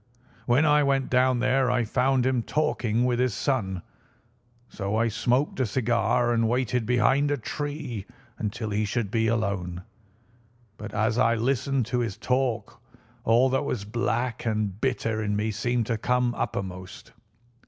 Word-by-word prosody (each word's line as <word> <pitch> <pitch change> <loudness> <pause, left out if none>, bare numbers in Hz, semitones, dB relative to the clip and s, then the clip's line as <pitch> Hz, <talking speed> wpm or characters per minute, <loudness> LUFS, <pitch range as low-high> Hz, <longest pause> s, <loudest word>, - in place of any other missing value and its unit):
"When 130 +5 +4
I 150 0 +5
went 135 -2 +1
down 130 -1 +3
there 130 0 +2
I 125 -1 +2
found 125 +3 +1
him 130 -2 +2
talking 125 -5 0
with 125 -1 +1
his 125 -5 +1
son, 100 -8 -1 0.8
so 100 +1 -3
I 115 +1 +2
smoked 125 +6 0
a 130 - +2
cigar 120 +1 +1
and 115 -1 +2
waited 125 -1 0
behind 130 +4 +3
a 145 - +1
tree 140 -4 -5 0.3
until 110 0 -3
he 105 +1 0
should 105 0 -2
be 115 -1 +1
alone. 100 -6 -1 0.9
But 105 -1 -8
as 110 +2 +1
I 115 -2 +4
listened 130 +2 0
to 125 +2 -1
his 115 -5 -2
talk 125 -5 -1 0.4
all 120 +3 +5
that 135 +2 +1
was 110 -7 -3
black 120 +2 -1
and 105 -3 -2
bitter 115 -4 0
in 105 -1 -1
me 105 +2 0
seemed 120 +2 -1
to 115 -1 -2
come 125 +1 +1
uppermost. 95 -3 -5
120 Hz, 155 wpm, -26 LUFS, 110-130 Hz, 0.9 s, I